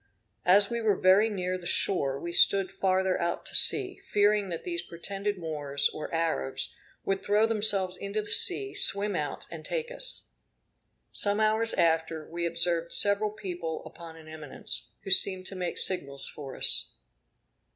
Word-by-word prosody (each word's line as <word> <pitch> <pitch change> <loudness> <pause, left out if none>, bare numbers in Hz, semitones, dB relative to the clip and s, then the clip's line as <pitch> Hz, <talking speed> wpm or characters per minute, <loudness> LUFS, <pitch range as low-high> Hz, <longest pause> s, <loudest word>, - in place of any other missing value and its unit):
As 200 +3 +5
we 235 0 -3
were 215 -3 +1
very 190 +5 +3
near 185 -3 -4
the 175 - -8
shore, 140 -8 -1
we 170 +3 -7
stood 195 +1 +4
farther 190 -1 -1
out 170 0 -3
to - - -6
sea, 395 -1 +3
fearing 205 - 0
that 170 - -6
these 345 -1 -4
pretended 200 +4 -6
Moors, 145 -4 -2
or 155 - -8
Arabs, 165 - -3 0.3
would 195 0 -2
throw 210 +2 +2
themselves 205 -4 +2
into 200 +2 -5
the 210 - -6
sea, 400 +2 +5
swim 205 - +2
out, 145 -3 -5
and 160 -2 -9
take 480 - -5
us. - - -4 0.9
Some 205 0 +1
hours 220 +1 +1
after, 160 -1 -1
we 170 0 -4
observed 170 0 0
several 205 +1 +4
people 175 -6 -7
upon 165 -1 -12
an 160 -1 -16
eminence, 155 -3 -4
who 195 - -7
seemed 185 0 +5
to 195 - -5
make 180 -2 -5
signals 140 -7 -3
for 135 -3 -10
us. - - +4
185 Hz, 160 wpm, -27 LUFS, 165-210 Hz, 0.9 s, As